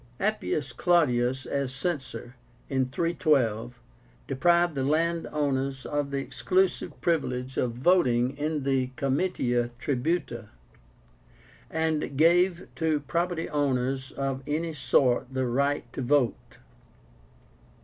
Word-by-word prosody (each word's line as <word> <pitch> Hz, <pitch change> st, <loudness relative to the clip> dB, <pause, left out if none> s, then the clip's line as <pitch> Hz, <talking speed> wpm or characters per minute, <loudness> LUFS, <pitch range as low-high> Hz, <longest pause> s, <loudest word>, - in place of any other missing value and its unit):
APPIUS 160 Hz, -, -1 dB
CLAUDIUS 130 Hz, -6 st, +2 dB
as 140 Hz, -2 st, -2 dB
Censor, 135 Hz, -4 st, -4 dB, 0.3 s
in 130 Hz, -2 st, 0 dB
312, 130 Hz, -7 st, +1 dB, 0.5 s
deprived 170 Hz, +5 st, +2 dB
the 135 Hz, -, -2 dB
landowners 145 Hz, -3 st, 0 dB
of 145 Hz, -1 st, -1 dB
the 140 Hz, -, -2 dB
exclusive 185 Hz, +6 st, 0 dB
privilege 130 Hz, -6 st, -1 dB
of 120 Hz, -2 st, 0 dB
voting 130 Hz, -3 st, +2 dB
in 150 Hz, 0 st, -2 dB
the 135 Hz, -2 st, +1 dB
Comitia 135 Hz, -5 st, 0 dB
Tribúta, 145 Hz, +5 st, -2 dB, 1.2 s
and 160 Hz, -3 st, -1 dB
gave 175 Hz, +3 st, +3 dB
to 160 Hz, -3 st, 0 dB
property 170 Hz, +3 st, -1 dB
owners 130 Hz, -2 st, -1 dB
of 135 Hz, -1 st, -2 dB
any 160 Hz, +2 st, -1 dB
sort 130 Hz, -2 st, +2 dB
the 130 Hz, -1 st, -1 dB
right 140 Hz, +4 st, 0 dB
to -, -, -4 dB
vote. 130 Hz, -3 st, 0 dB
140 Hz, 105 wpm, -27 LUFS, 130-160 Hz, 1.2 s, gave